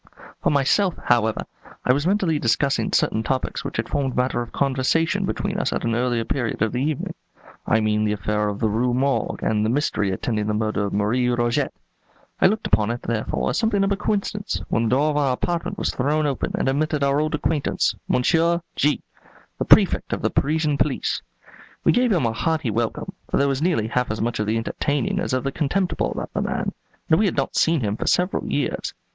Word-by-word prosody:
For - - +2
myself, 160 +7 +2
however, 110 -2 +2 0.4
I 125 - +5
was 145 +5 0
mentally 185 -6 +1
discussing 115 0 +1
certain 110 - +2
topics 130 +2 -2
which - - -5
had - - -1
formed 135 -3 -1
matter 125 -1 0
for 120 - -12
conversation 140 +4 +1
between - - -2
us - - 0
at - - -2
an 115 - 0
earlier 120 -1 0
period 120 -5 -1
of 110 - 0
the 125 - -2
evening; 150 0 -2 0.5
I 110 - +3
mean 105 0 +1
the 105 - +1
affair 105 +1 -1
of 100 - -4
the 110 - +2
Rue 120 +3 +1
Morgue 135 +2 0
and 105 -1 +1
the 110 - +1
mystery 115 -6 0
attending 105 +2 -2
the 105 - 0
murder 105 -1 0
of 100 - -3
Marie 110 +5 +1
Roget. 120 -1 +1 0.7
I - - +7
looked 215 +3 -1
upon 105 +1 +2
it, 120 +1 -3
therefore, 110 -1 -1
as - - 0
something 220 -3 +2
of 195 - +1
a - - +3
coincidence, 205 0 -2
when 115 - +1
the - - +1
door 140 +5 +3
of 145 - -1
our 140 -3 +2
apartment 170 +6 -2
was - - -1
thrown 150 +4 +1
open 140 -3 -2
and - - 0
admitted 150 +2 0
our 140 +1 +2
old 155 0 0
acquaintance, 150 -1 0
Monsieur 170 +6 +2
G, 150 +1 +1 0.6
the - - 0
Prefect - - +4
of - - -3
the - - +1
Parisian 150 0 +1
police. - - 0 0.6
We - - +5
gave 245 -1 +2
him 175 - +2
a 115 - 0
hearty 155 -1 0
welcome; 115 +1 -2 0.2
for - - +1
there 140 - +3
was 135 0 -1
nearly 165 -10 +1
half 125 +1 0
as 110 - -3
much 115 +1 -1
of 105 - -1
the 110 +1 +1
entertaining 145 +4 -1
as - - -2
of 130 0 0
the 135 - -1
contemptible 175 +6 0
about - - -5
the - - -1
man, - - -2 0.4
and 160 0 +4
we 215 - +3
had 175 - -2
not 135 - -1
seen 165 -3 +3
him 105 -2 -1
for - - -4
several 180 +2 +1
years. 145 - -2
130 Hz, 215 wpm, -23 LUFS, 115-155 Hz, 0.7 s, I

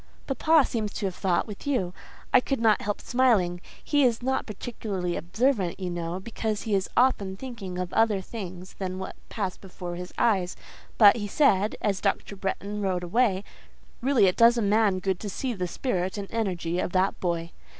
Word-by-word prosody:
"Papa 305 +2 +4
seems 215 -3 -3
to 210 - -3
have 190 - -1
thought 180 -1 0
with 210 +5 -9
you. 195 -11 0 0.4
I - - +8
could 270 +1 -2
not 220 -2 +4
help 205 0 -2
smiling. 215 -9 +2 0.2
He 290 -1 +2
is 240 -2 +2
not 265 +1 0
particularly 200 -5 -4
observant, 195 0 0
you 180 -2 -3
know, 175 +1 -3
because 215 +1 -3
he 220 - -2
is 195 -1 +1
often 200 -7 +2
thinking 215 -7 -6
of 180 -1 -4
other 220 -3 +3
things 185 -3 -8
than 185 -1 -3
what 190 - -6
pass 195 -5 -3
before 180 -2 -7
his 180 0 -7
eyes; 190 -6 +2 0.4
but 210 0 +8
he 205 -2 -3
said, 205 -4 +3
as 200 -3 0
Dr. 200 0 -1
Bretton 200 +2 -3
rode 185 -2 0
away, 195 +1 +2 0.6
Really 260 -4 +4
it 180 - +2
does 235 +1 +6
a - - +1
man 205 -1 +3
good 185 -1 -1
to 210 - -5
see 250 +5 -3
the 180 -4 -3
spirit 185 -2 -2
and 200 -1 -4
energy 180 -6 -1
of 180 - -2
that 190 +1 +1
boy. 170 -2 -2
200 Hz, 190 wpm, -27 LUFS, 185-230 Hz, 0.6 s, I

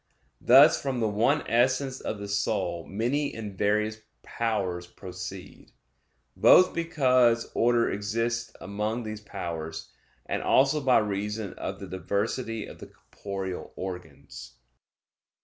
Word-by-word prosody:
Thus, 140 +6 +7
from 135 -3 -2
the 110 - +1
one 115 +8 +1
essence 130 +3 +1
of 110 - -4
the 100 0 -7
soul 100 -4 -1
many 125 +9 -1
and 105 -3 -6
various 105 +2 0 0.2
powers 95 -7 -2
proceed; 90 -1 -9 0.6
both 185 - +6
because 130 -8 +2
order 120 0 +3
exists 115 +4 -2
among 105 +4 -3
these 110 -1 -6
powers; 85 -6 -6 0.3
and - - -2
also 140 +3 +3
by 130 -2 +4
reason 105 0 -2
of - - -6
the - - -7
diversity 100 +5 -3
of - - -12
the - - -10
corporeal 95 -2 -7
organs. 85 -9 -8
110 Hz, 120 wpm, -27 LUFS, 100-120 Hz, 0.6 s, Thus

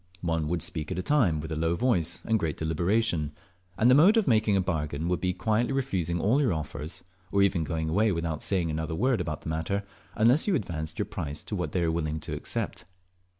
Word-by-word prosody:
One 80 -3 0
would 85 0 -1
speak 80 0 -4
at 90 - -2
a 90 - -2
time, 110 - +2
with 80 +2 -6
a - - -1
low 80 +2 +1
voice 90 -7 0
and 110 -1 +2
great 80 -5 -2
deliberation, 85 0 0 0.4
and 115 - +4
the 125 - +7
mode 180 - +6
of 220 - +2
making 110 -4 +3
a - - +3
bargain 80 -3 -2
would 90 -1 0
be 90 - +1
by - - -9
quietly 115 +3 +2
refusing 95 -11 -1
all 120 - +3
your 125 -10 +2
offers, 75 +1 -5 0.3
or 100 0 +4
even 95 -4 +2
going 80 0 -2
away 105 +7 +2
without 85 -3 -2
saying 90 -5 0
another 80 +1 -3
word 125 +2 +1
about 75 -3 -4
the - - -6
matter, 80 +6 -1 0.3
unless 120 - +4
advanced 90 - -2
your - - 0
price 75 +1 -5
to - - -4
what - - -2
they 90 - 0
were 80 - +1
willing 80 -1 -2
to - - -6
accept. - - -4
85 Hz, 225 wpm, -28 LUFS, 80-110 Hz, 0.4 s, the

